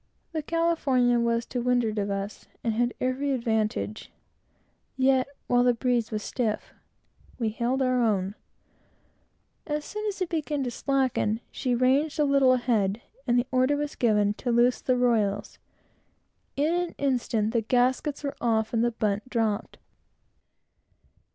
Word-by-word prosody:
The 320 -2 -2
California 285 -7 +2
was 235 0 +1
to 245 - -3
windward 240 -3 +1
of 200 0 -1
us, 200 +1 -4 0.2
and 230 - 0
had 240 +2 +1
every 265 +2 0
advantage; 215 - -2 0.9
yet, 260 0 +3 0.2
while 245 0 +3
the 245 -1 +3
breeze 240 -1 0
was 215 -2 -3
stiff, 225 -4 -2 0.6
we 230 -3 0
held 240 +5 0
our 255 -1 +2
own. 200 -4 +1 1.3
As 300 -1 -2
soon 425 +1 -5
as 400 -2 -3
it 370 - 0
began 300 -4 -1
to 245 - -3
slacken, 255 -5 0
she 250 -2 -1
ranged 275 +6 +2
a - - +5
little 275 -2 +4
ahead, 225 -5 +1 0.3
and 240 0 +3
the 245 - +2
order 255 +2 +3
was 295 0 -3
given 210 -3 +2
to 245 - 0
loose 240 +1 +3
the 255 -1 +1
royals. 225 -5 0 1.0
In 300 +4 +1
an 350 -1 -1
instant 240 -5 0
the 230 - +2
gaskets 255 +6 +1
were 280 - -3
off 220 -1 +1
and 230 0 +2
the 240 - +3
bunt 210 +1 -1
dropped. 225 -4 -1
245 Hz, 150 wpm, -27 LUFS, 225-270 Hz, 1.3 s, a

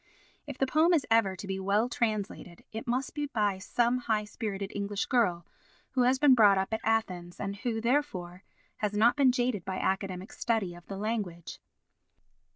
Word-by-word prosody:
If - - -6
the 270 - +2
poem 315 +6 +4
is 300 - +1
ever 220 -4 +3
to 195 - -8
be 190 0 -3
well 200 +4 +1
translated, 215 -7 -3
it 220 +2 -6
must 250 +2 -1
be 295 -1 -2
by 210 -7 0
some 240 +5 +1
high 220 -3 0
spirited 205 -2 -5
English 200 0 -2
girl 180 -10 +1 0.5
who 260 - +1
has 250 +2 +4
been 285 -1 +6
brought 210 -5 +6
up 190 +3 -1
at 220 - -1
Athens 185 -6 -1
and 200 0 -4
who, 225 +1 -2
therefore, 220 -8 -1 0.3
has 210 -1 -2
not 220 +3 +4
been 275 -3 +5
jaded 245 -6 -1
by 185 +1 -4
academic 190 0 -2
study 220 -7 -1
of 175 0 -14
the 195 - -6
language. 200 -5 -4
215 Hz, 180 wpm, -29 LUFS, 195-245 Hz, 0.5 s, been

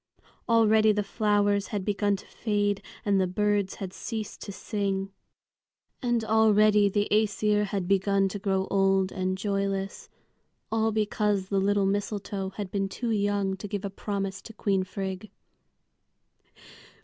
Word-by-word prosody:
Already 220 -1 +5
the 210 0 0
flowers 205 0 +1
had 205 -3 -3
begun 205 -1 +1
to 195 - -10
fade 205 -2 -1 0.2
and 200 -2 +3
the 185 - +1
birds 205 +1 0
had 190 -2 -6
ceased 215 -2 -5
to 205 - -6
sing. 195 -1 -2 0.9
And 240 -2 +1
already 215 -2 +4
the 205 +1 0
Æsir 210 0 +2
had 195 -3 -3
begun 195 0 +2
to 205 - -5
grow 190 -1 0
old 195 -1 +3
and 185 0 -2
joyless, 195 -1 -2 0.6
all 225 0 +2
because 210 -2 0
the 195 - +1
little 200 0 +2
mistletoe 200 -1 -2
had 195 -1 -6
been 195 -2 -1
too 235 +4 -3
young 200 -2 0
to 205 - -6
give 205 0 -4
a 200 - -4
promise 195 -1 -4
to 225 - -11
Queen 195 -3 0
Frigg. 190 +2 -5
200 Hz, 145 wpm, -27 LUFS, 195-210 Hz, 0.9 s, Already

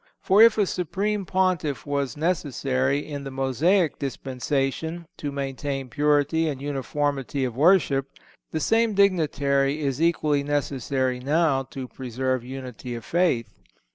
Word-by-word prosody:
For 195 +3 +4
if 230 -1 +7
a 210 - +3
supreme 195 +3 -2
Pontiff 185 -7 0
was 140 -1 -2
necessary, 140 -4 0
in 145 -2 -5
the 135 - -5
Mosaic 140 - +1
dispensation, 135 +5 -2
to 145 - -4
maintain 135 -1 -4
purity 150 +3 +2
and 140 -3 -4
uniformity 140 0 -2
of 120 -3 -4
worship, 140 -3 +3 0.4
the 160 - -1
same 225 +4 +2
dignitary 150 -7 +2
is 140 0 -1
equally 155 -3 +2
necessary 135 -3 -1
now 145 +1 +2
to 130 0 -7
preserve 130 +1 -3
unity 125 -1 -7
of 115 - -8
faith. 170 -10 0
145 Hz, 130 wpm, -25 LUFS, 135-165 Hz, 0.4 s, if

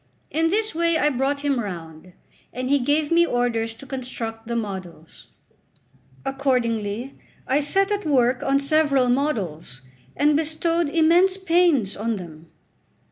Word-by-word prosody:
In 325 +1 +1
this 430 +3 0
way 335 0 +1
I 295 -1 +2
brought 275 +2 -1
him 280 -3 0
round, 175 -4 -7 0.4
and 255 +1 -3
he 285 - +4
gave 290 +4 +1
me 340 0 +5
orders 235 -5 -1
to 255 - -12
construct 235 -4 -6
the 235 - -3
models. 190 -7 -7 1.0
Accordingly 245 -3 -1 0.3
I 265 +3 +2
set 390 +7 +1
at 410 0 -1
work 255 -5 +2
on 275 0 +2
several 275 -2 +2
models, 195 - -2 0.3
and 295 +1 +3
bestowed 320 +1 0
immense 340 +4 +3
pains 335 - +2
on 225 +2 -2
them. 165 -4 -10
270 Hz, 135 wpm, -23 LUFS, 225-315 Hz, 1.0 s, me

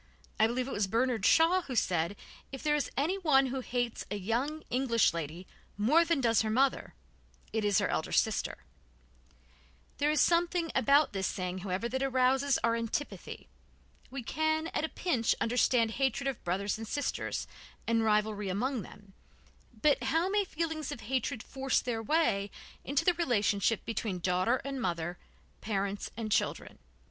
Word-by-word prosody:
I 220 - +6
believe 250 +2 -2
it - - -5
was 205 -1 0
Bernard 230 0 +1
Shaw 335 +3 +5
who 265 -7 -6
said: 175 -3 +1 0.4
"If 270 - -7
there 300 -1 +2
is 295 -1 0
anyone 305 -3 +3
who 265 - -2
hates 245 -2 -2
a 205 - -2
young 240 +10 -2
English 240 -6 +2
lady 165 +2 -5 0.3
more 275 +11 +4
than 335 -3 +1
does 230 -4 +3
her 220 - -1
mother, 265 +5 +1 0.6
it 220 -1 0
is 205 -2 +3
her 200 -3 +2
elder 160 - -2
sister." 220 -2 +1 1.4
There 290 +1 +2
is 305 -1 +2
something 340 -1 +2
about 280 +1 +4
this 190 -1 -1
saying, 180 0 -3
however, 185 +4 -2
that 260 +2 -3
arouses 265 +1 +2
our 230 0 +3
antipathy. 230 +5 -4 0.6
We 265 -2 -6
can, 315 +5 0
at - - -1
a 320 - -1
pinch, 255 -11 0
understand 230 -1 +2
hatred 270 +3 0
of 270 -3 -3
brothers 195 +4 -1
and 225 - -6
sisters, 285 +6 -2 0.4
and 230 -1 +2
rivalry 210 -2 +1
among 240 +6 -1
them, 200 0 -14 0.7
but 290 -3 +4
how 325 +6 +2
may 410 0 +2
feelings 320 -4 -3
of 225 - -6
hatred 250 +1 -2
force 270 -1 0
their 230 -3 -3
way 215 -7 +1 0.3
into 280 +1 0
the 355 - +5
relationship 225 - +1
between 220 -4 -2
daughter 180 +6 +1
and 275 -2 -4
mother, 175 -3 -2 0.4
parents 200 -1 -2
and 220 -2 -4
children? - - -1
240 Hz, 160 wpm, -31 LUFS, 205-285 Hz, 1.4 s, I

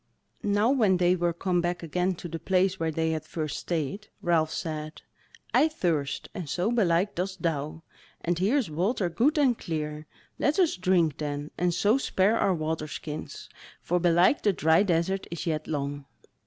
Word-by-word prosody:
Now 205 +4 +2
when 215 -9 +3
they 180 0 +3
were 175 -1 +1
come 175 +1 0
back 175 0 -2
again 180 +3 0
to 175 - -7
the 165 0 -5
place 185 +2 +1
where 165 0 0
they 160 +1 0
had 155 -1 -2
first 155 -1 -4
stayed, 170 +5 -3 0.2
Ralph 160 -2 +2
said: 155 -1 -5 0.5
"I 310 - +5
thirst, 165 - -1
and 180 -7 -6
so 180 +9 0
belike 195 -4 +2
dost 185 0 -4
thou; 155 0 -2 0.4
and 175 0 -1
here 210 +10 +2
is 235 - -1
water 185 +4 0
good 260 - +2
and 270 -5 +4
clear; 155 -4 -4 0.3
let 295 - +2
us 360 -5 +3
drink 180 -5 +2
then, 145 -1 -4
and 175 0 +1
so 210 +8 +2
spare 210 -2 +2
our 190 - +2
water 155 -1 -2
skins, 150 +1 -7 0.3
for 180 +1 0
belike 175 +9 +4
the 205 - +2
dry 160 0 +4
desert 190 0 0
is 170 -2 -5
yet 155 -2 -2
long." 145 -1 -3
175 Hz, 180 wpm, -27 LUFS, 155-190 Hz, 0.5 s, I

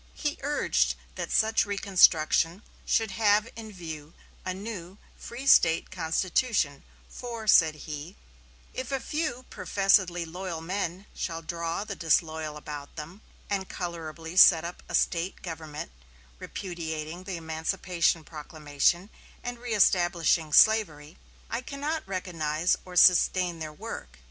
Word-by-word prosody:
He 295 -1 -3
urged 290 +2 +1 0.2
that - - -5
such 220 0 +3
reconstruction 185 -2 +3 0.2
should 225 -3 +2
have 210 +1 +3
in 220 -1 -8
view 160 -4 -8 0.3
a 185 - -2
new 190 -1 -7 0.2
free 245 +3 -8
State 165 -11 +5
constitution, 170 - 0 0.3
for, 235 -3 -7
said 160 -6 +5
he: 155 +3 -7 0.6
"If 260 +2 -5
a 270 - 0
few 260 -2 -3
professedly 190 -3 +2
loyal 175 0 -5
men 185 +2 -3
shall 165 -1 -4
draw 170 +2 -3
the 210 -2 -6
disloyal 160 -2 0
about 145 -1 -8
them, 165 +7 -9 0.3
and 195 -2 -2
colorably 165 -1 -6
set 170 -3 +8
up 175 - -7
a - - -1
State 170 +2 0
government 160 - -6 0.5
repudiating 170 -1 -6
the 185 -2 -4
emancipation 165 +1 -1
proclamation 155 +4 -1 0.3
and 245 -1 -5
reëstablishing 175 -8 +2
slavery, 165 -9 +4 0.3
I 230 - -3
cannot 295 +4 -4
recognize 170 -3 0
or 180 -1 -10
sustain 180 -1 +5
their 155 -1 -5
work.... 65 - -8
175 Hz, 125 wpm, -28 LUFS, 160-205 Hz, 0.6 s, set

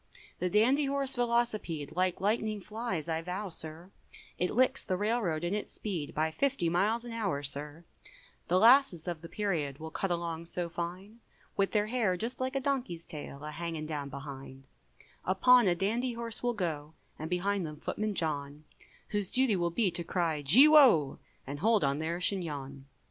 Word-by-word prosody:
The 180 - 0
dandy 250 +9 +3
horse 275 -1 0
Velocipede, 235 - -1
Like 185 0 +1
lightning 215 +1 0
flies, 210 -5 -4
I 160 -1 -1
vow, 185 +4 -4
sir, 165 +2 -4 0.5
It 180 - +1
licks 255 +3 +2
the 185 - -1
railroad 205 -6 0
in 175 +2 -1
its 210 - -4
speed, 175 -9 -4
By 155 +1 +1
fifty 260 - 0
miles 215 +7 +1
an 240 - -7
hour, 200 -11 -2
sir, 145 +3 -2 0.6
The 180 - +3
lasses 230 - +5
of 170 -3 -3
the 165 - -9
period, 165 -10 -2
Will 160 +1 -8
cut 195 - -2
along 170 -1 -3
so 175 0 -2
fine, 180 +6 -6 0.4
With 195 -1 +1
their 210 -1 +2
hair 215 -5 0
just 230 +7 -4
like 260 +1 -2
a - - +2
donkey's 255 -12 -2
tail, 145 -2 -8
A 150 - -5
hanging 165 -1 -4
down 145 -2 -4
behind; 135 -1 -9 0.6
Upon 240 +5 +5
a 175 - +3
dandy 230 +7 -1
horse 230 -1 -3
will 245 0 0
go, 160 -5 -3 0.2
And 155 +1 -5
behind 190 +2 0
them 150 -2 -7
footman 215 -1 -3
John, 150 -3 -3 0.5
Whose 205 -3 -1
duty 255 -5 +2
will 175 -2 0
be 190 +2 +1
to 175 0 -4
cry, 165 -3 -1
gee 210 - +7
wo! 250 - +6 0.3
And 140 +2 -6
hold 220 +3 +3
on 140 +1 +1
their 165 +2 -2
chignon. 145 -8 -3
180 Hz, 180 wpm, -31 LUFS, 160-225 Hz, 0.6 s, gee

